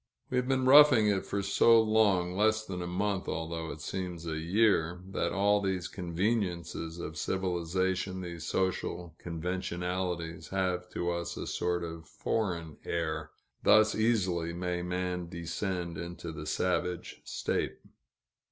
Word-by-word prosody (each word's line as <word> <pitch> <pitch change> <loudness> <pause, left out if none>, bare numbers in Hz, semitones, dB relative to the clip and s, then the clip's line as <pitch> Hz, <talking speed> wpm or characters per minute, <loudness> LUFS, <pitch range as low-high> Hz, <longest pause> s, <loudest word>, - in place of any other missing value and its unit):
We 125 - +1
have 125 0 +1
been 130 -1 +2
roughing 135 -4 +8
it 100 -2 0
for 100 0 -1
so 115 +4 +6
long, 105 -5 +3
less 110 +2 +2
than 90 -3 -5
a 85 - -3
month, 95 +2 -1
although 80 0 -3
it 75 - -7
seems 90 0 -4
a 80 -1 -2
year, 90 -1 +2
that - - 0
all 100 +1 +3
these 95 -3 -1
conveniences 90 -2 -2
of 80 -2 -5
civilization, 95 +1 -1
these 85 -2 -6
social 90 -2 -1
conventionalities, 90 0 -3
have 90 -2 -1
to 85 0 0
us 85 0 -3
a - - -4
sort 85 -1 -1
of 80 -1 -7
foreign 85 -8 -2
air. 80 -2 -2 0.3
Thus 110 0 +6
easily 95 -7 +1
may 90 0 -2
man 90 -1 -2
descend 85 0 -3
into 85 -1 -6
the 75 -1 -7
savage 90 +1 -1
state. - - -2
90 Hz, 140 wpm, -31 LUFS, 85-100 Hz, 0.3 s, roughing